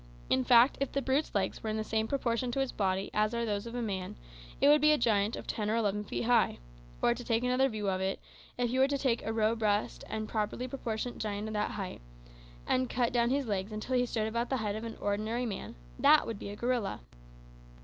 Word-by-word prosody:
In 130 Hz, -, +3 dB
fact, 240 Hz, -, +5 dB
if 275 Hz, -, 0 dB
the 275 Hz, -, 0 dB
brute's 270 Hz, +2 st, 0 dB
legs 200 Hz, -, 0 dB
were 220 Hz, -, -3 dB
in 215 Hz, -, -1 dB
the 215 Hz, -, -1 dB
same 220 Hz, 0 st, -1 dB
proportion 245 Hz, -2 st, -1 dB
to 275 Hz, -, -1 dB
its 270 Hz, -1 st, 0 dB
body 190 Hz, -1 st, -1 dB
as 215 Hz, +2 st, +1 dB
are 235 Hz, 0 st, 0 dB
those 205 Hz, 0 st, -2 dB
of 235 Hz, -, -7 dB
a 245 Hz, -, -2 dB
man, 190 Hz, -4 st, -3 dB, 0.4 s
it -, -, +4 dB
would 295 Hz, 0 st, +6 dB
be 305 Hz, 0 st, +6 dB
a 300 Hz, -, +4 dB
giant 215 Hz, -3 st, +2 dB
of -, -, -7 dB
ten 210 Hz, -1 st, -2 dB
or 220 Hz, -, +1 dB
eleven 210 Hz, -2 st, 0 dB
feet 210 Hz, -, -3 dB
high. 240 Hz, +1 st, +3 dB, 0.5 s
Or, 240 Hz, -, +5 dB
to 245 Hz, +1 st, -8 dB
take 230 Hz, 0 st, 0 dB
another 255 Hz, +2 st, +3 dB
view 215 Hz, -3 st, -3 dB
of 190 Hz, -1 st, 0 dB
it, 190 Hz, 0 st, -1 dB, 0.4 s
if 245 Hz, -1 st, 0 dB
you 260 Hz, -, +1 dB
were 265 Hz, -, +6 dB
to 280 Hz, 0 st, 0 dB
take 255 Hz, -4 st, 0 dB
a 220 Hz, -, -2 dB
robust 220 Hz, -1 st, 0 dB
and 215 Hz, 0 st, -3 dB
properly 220 Hz, +4 st, -2 dB
proportioned 245 Hz, -2 st, -4 dB
giant 210 Hz, 0 st, -3 dB
of -, -, -5 dB
that 210 Hz, 0 st, 0 dB
height, 190 Hz, -, -5 dB, 0.6 s
and 255 Hz, -1 st, +1 dB
cut 240 Hz, -1 st, 0 dB
down 235 Hz, -1 st, +3 dB
his 275 Hz, +1 st, +1 dB
legs 200 Hz, -1 st, -2 dB
until 215 Hz, +4 st, -3 dB
he 245 Hz, 0 st, +2 dB
stood 220 Hz, -2 st, -1 dB
about 235 Hz, +2 st, -2 dB
the 265 Hz, -, +1 dB
height 210 Hz, -3 st, -2 dB
of 220 Hz, +1 st, -5 dB
an 225 Hz, -, -6 dB
ordinary 215 Hz, +4 st, -1 dB
man, 205 Hz, -5 st, -5 dB, 0.2 s
that 305 Hz, -, +6 dB
would 225 Hz, -3 st, -5 dB
be -, -, -6 dB
a 205 Hz, -, -6 dB
gorilla." 235 Hz, -, -1 dB
225 Hz, 240 wpm, -31 LUFS, 210-245 Hz, 0.6 s, would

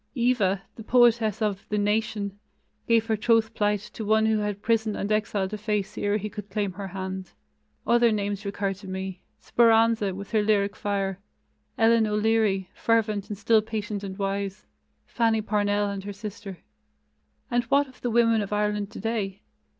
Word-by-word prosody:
"Eva," 225 Hz, -6 st, +1 dB
the 225 Hz, -, -8 dB
poetess 235 Hz, -2 st, +3 dB
of 200 Hz, -2 st, -1 dB
the 210 Hz, -, 0 dB
Nation, 205 Hz, -1 st, -1 dB, 0.5 s
gave 230 Hz, -1 st, +3 dB
her 225 Hz, -1 st, +1 dB
troth 225 Hz, +1 st, +2 dB
plight 210 Hz, -1 st, +1 dB
to 220 Hz, -, -5 dB
one 220 Hz, +1 st, +3 dB
who 220 Hz, -1 st, +2 dB
had 205 Hz, -1 st, -3 dB
prison 220 Hz, -2 st, +1 dB
and 200 Hz, -, -3 dB
exile 210 Hz, -2 st, 0 dB
to 210 Hz, +2 st, -6 dB
face 210 Hz, -2 st, -2 dB
ere 205 Hz, 0 st, 0 dB
he 210 Hz, 0 st, -4 dB
could 210 Hz, -1 st, -8 dB
claim 205 Hz, -3 st, -1 dB
her 195 Hz, +2 st, -6 dB
hand. 190 Hz, 0 st, -6 dB, 0.5 s
Other 235 Hz, -1 st, +4 dB
names 205 Hz, -1 st, -2 dB
recur 200 Hz, -1 st, -2 dB
to 195 Hz, +1 st, -13 dB
me 190 Hz, -1 st, -5 dB, 0.2 s
"Speranza", 225 Hz, -4 st, +3 dB
with 200 Hz, +1 st, -8 dB
her 220 Hz, -2 st, +3 dB
lyric 205 Hz, -1 st, +1 dB
fire; 195 Hz, -2 st, -2 dB, 0.6 s
Ellen 225 Hz, -1 st, +4 dB
O'Leary, 210 Hz, -2 st, +1 dB
fervent 215 Hz, -3 st, 0 dB
and 210 Hz, -, -4 dB
still 220 Hz, +1 st, +4 dB
patient 210 Hz, -2 st, -4 dB
and 190 Hz, -1 st, -6 dB
wise; 200 Hz, 0 st, -3 dB, 0.4 s
Fanny 225 Hz, -2 st, +1 dB
Parnell 205 Hz, -1 st, 0 dB
and 195 Hz, -1 st, -5 dB
her 205 Hz, -, -5 dB
sister. 205 Hz, -1 st, -8 dB, 0.9 s
And 240 Hz, 0 st, +2 dB
what 280 Hz, +3 st, +3 dB
of 260 Hz, -, -18 dB
the 245 Hz, -, -1 dB
women 230 Hz, -1 st, +3 dB
of 205 Hz, -, -5 dB
Ireland 210 Hz, -1 st, 0 dB
today? 215 Hz, -3 st, -3 dB
210 Hz, 170 wpm, -26 LUFS, 200-225 Hz, 0.9 s, Other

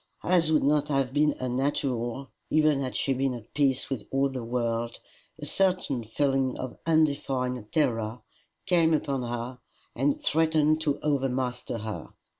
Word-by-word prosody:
As 170 Hz, -3 st, +3 dB
would 155 Hz, -, +3 dB
not 145 Hz, +1 st, +3 dB
have 135 Hz, -3 st, 0 dB
been 150 Hz, 0 st, +3 dB
unnatural, 130 Hz, -1 st, -1 dB, 0.2 s
even 155 Hz, -2 st, +3 dB
had 130 Hz, -2 st, -3 dB
she 135 Hz, -, +1 dB
been 135 Hz, 0 st, 0 dB
at 115 Hz, -2 st, -11 dB
peace 140 Hz, -3 st, +2 dB
with 125 Hz, -6 st, -3 dB
all 135 Hz, +1 st, +2 dB
the 130 Hz, -3 st, -5 dB
world, 115 Hz, -1 st, -2 dB, 0.4 s
a 150 Hz, -, -7 dB
certain 180 Hz, -7 st, +1 dB
feeling 135 Hz, +3 st, 0 dB
of 130 Hz, -1 st, -6 dB
undefined 135 Hz, -7 st, +1 dB
terror 115 Hz, -6 st, 0 dB, 0.4 s
came 170 Hz, -4 st, +4 dB
upon 140 Hz, -3 st, -1 dB
her 120 Hz, +1 st, -4 dB, 0.4 s
and 140 Hz, +4 st, +1 dB
threatened 155 Hz, -1 st, +2 dB
to 145 Hz, -3 st, 0 dB
overmaster 130 Hz, -4 st, -1 dB
her. 110 Hz, -1 st, -5 dB
135 Hz, 145 wpm, -27 LUFS, 125-150 Hz, 0.4 s, came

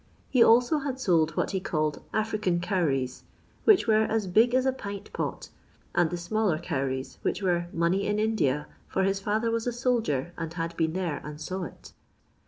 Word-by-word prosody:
He 255 Hz, -, +4 dB
also 245 Hz, +7 st, +5 dB
had 275 Hz, -2 st, -4 dB
sold 165 Hz, -8 st, +2 dB
what -, -, 0 dB
he 190 Hz, -, 0 dB
called 155 Hz, -5 st, -1 dB
" -, -, -34 dB
African 210 Hz, -6 st, 0 dB
cowries," 145 Hz, -9 st, -1 dB, 0.4 s
which 425 Hz, -4 st, +6 dB
were 220 Hz, -1 st, +4 dB
as 220 Hz, -1 st, 0 dB
" 180 Hz, -, -4 dB
big 240 Hz, +2 st, +1 dB
as 260 Hz, 0 st, +3 dB
a 265 Hz, -, +3 dB
pint 200 Hz, -5 st, -7 dB
pot," -, -, -4 dB, 0.4 s
and 175 Hz, -2 st, +3 dB
the 175 Hz, -, -3 dB
smaller 185 Hz, 0 st, 0 dB
cowries, 135 Hz, -5 st, -3 dB
which -, -, -1 dB
were 175 Hz, -2 st, +1 dB
money 170 Hz, +4 st, +1 dB
in 205 Hz, 0 st, 0 dB
India, 180 Hz, -10 st, +1 dB, 0.2 s
for 190 Hz, -, 0 dB
his 195 Hz, +1 st, 0 dB
£ither 215 Hz, +3 st, 0 dB
was 230 Hz, +1 st, -1 dB
a -, -, +1 dB
soldier 230 Hz, -, 0 dB
and 165 Hz, 0 st, -5 dB
had 165 Hz, 0 st, -3 dB
been 160 Hz, -1 st, 0 dB
there 175 Hz, -6 st, -2 dB
and 150 Hz, 0 st, -8 dB
saw 185 Hz, +3 st, -4 dB
it." -, -, -12 dB
185 Hz, 195 wpm, -27 LUFS, 165-220 Hz, 0.4 s, which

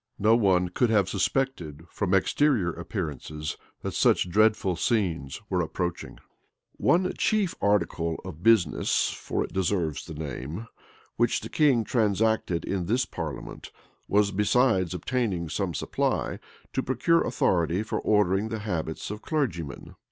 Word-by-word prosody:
No 110 Hz, +3 st, +4 dB
one 95 Hz, -5 st, +3 dB
could 120 Hz, +7 st, +1 dB
have 100 Hz, -4 st, +3 dB
suspected, 95 Hz, -, -1 dB
from 95 Hz, -2 st, 0 dB
exterior 105 Hz, -, +2 dB
appearances, 75 Hz, -, -5 dB, 0.3 s
that -, -, -3 dB
such 90 Hz, -, +2 dB
dreadful 105 Hz, -2 st, +3 dB
scenes 85 Hz, -, -1 dB
were 90 Hz, -3 st, 0 dB
approaching. 90 Hz, +1 st, -4 dB, 0.6 s
One 185 Hz, +2 st, +2 dB
chief 210 Hz, -5 st, +2 dB
article 85 Hz, -5 st, +1 dB
of 85 Hz, -4 st, -8 dB
business, 105 Hz, -8 st, +3 dB
(for -, -, -3 dB
it -, -, -8 dB
deserves 90 Hz, -5 st, 0 dB
the 80 Hz, -, -7 dB
name,) 75 Hz, -, -5 dB, 0.5 s
which 120 Hz, 0 st, +2 dB
the -, -, -7 dB
king 140 Hz, -7 st, +3 dB
transacted 110 Hz, -5 st, +1 dB
in 90 Hz, -3 st, -2 dB
this 120 Hz, +5 st, +1 dB
parliament, 80 Hz, -6 st, -7 dB, 0.4 s
was, 100 Hz, 0 st, +3 dB
besides 100 Hz, -3 st, +2 dB
obtaining 95 Hz, -, -1 dB
some 90 Hz, -1 st, -2 dB
supply, -, -, -1 dB, 0.3 s
to 130 Hz, -, +1 dB
procure 130 Hz, +7 st, +2 dB
authority 85 Hz, +2 st, +1 dB
for 110 Hz, -, -2 dB
ordering 105 Hz, 0 st, +2 dB
the 110 Hz, -, -3 dB
habits 80 Hz, -3 st, -3 dB
of 105 Hz, +1 st, -6 dB
clergymen. 85 Hz, -, -3 dB
95 Hz, 135 wpm, -27 LUFS, 85-115 Hz, 0.6 s, No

